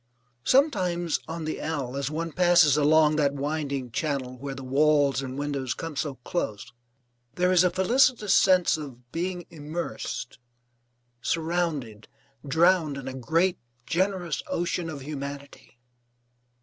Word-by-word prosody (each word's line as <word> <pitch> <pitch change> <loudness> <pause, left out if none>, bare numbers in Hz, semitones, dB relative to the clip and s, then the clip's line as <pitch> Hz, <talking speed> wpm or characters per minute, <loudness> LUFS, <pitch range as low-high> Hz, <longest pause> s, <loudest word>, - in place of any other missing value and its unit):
Sometimes, 180 - +2
on 160 0 -5
the 155 - -3
L, 140 -5 -3
as 140 +1 -2
one 165 +2 -3
passes 175 -4 +5
along 150 +1 +4
that 145 -2 +2
winding 140 -3 -3
channel 135 -2 -2
where 135 +2 -6
the 135 - -8
walls 140 0 +3
and 130 0 -6
windows 140 -5 -2
come 165 -2 -6
so 140 -1 -2
close, 125 - -3 0.6
there 180 +1 +2
is 185 -1 +5
a 180 - +4
felicitous 215 +3 +3
sense 185 -4 +4
of 125 -5 -10
being 175 +1 -3
immersed, 155 -4 -5 0.8
surrounded, 160 -10 -2 0.4
drowned 160 0 +3
in 135 -1 -7
a 130 - -4
great, 165 +8 +1 0.3
generous 185 -2 -1
ocean 175 0 -2
of 145 -3 -7
humanity. 140 -2 -8
155 Hz, 130 wpm, -26 LUFS, 140-175 Hz, 0.8 s, passes